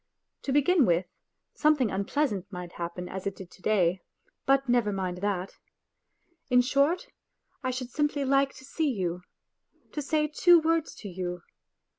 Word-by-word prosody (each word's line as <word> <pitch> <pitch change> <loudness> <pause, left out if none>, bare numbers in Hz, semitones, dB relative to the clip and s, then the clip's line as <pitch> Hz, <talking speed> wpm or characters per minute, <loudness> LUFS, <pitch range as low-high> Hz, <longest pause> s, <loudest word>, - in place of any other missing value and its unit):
To 275 - -1
begin 290 +1 +4
with, 175 +1 +2 0.5
something 295 -8 +3
unpleasant 200 -1 -1
might 180 -2 -7
happen 175 +1 -5
as 190 +1 -5
it 200 - -3
did 185 -2 -11
to - - -17
day, 185 -4 +2 0.5
but 275 0 +3
never 240 -4 +2
mind 185 -2 -2
that.. 195 -2 -3 0.9
In 250 -1 +6
short, 285 - +2 0.6
I 255 - -1
should 255 -1 -4
simply 295 -2 0
like 275 0 +2
to 260 - -12
see 310 +2 -1
you... 180 -7 -2 0.7
to 300 - -3
say 300 +2 +1
two 340 +3 +5
words 325 0 0
to 210 - -9
you. 180 -1 -5
245 Hz, 155 wpm, -28 LUFS, 185-290 Hz, 0.9 s, In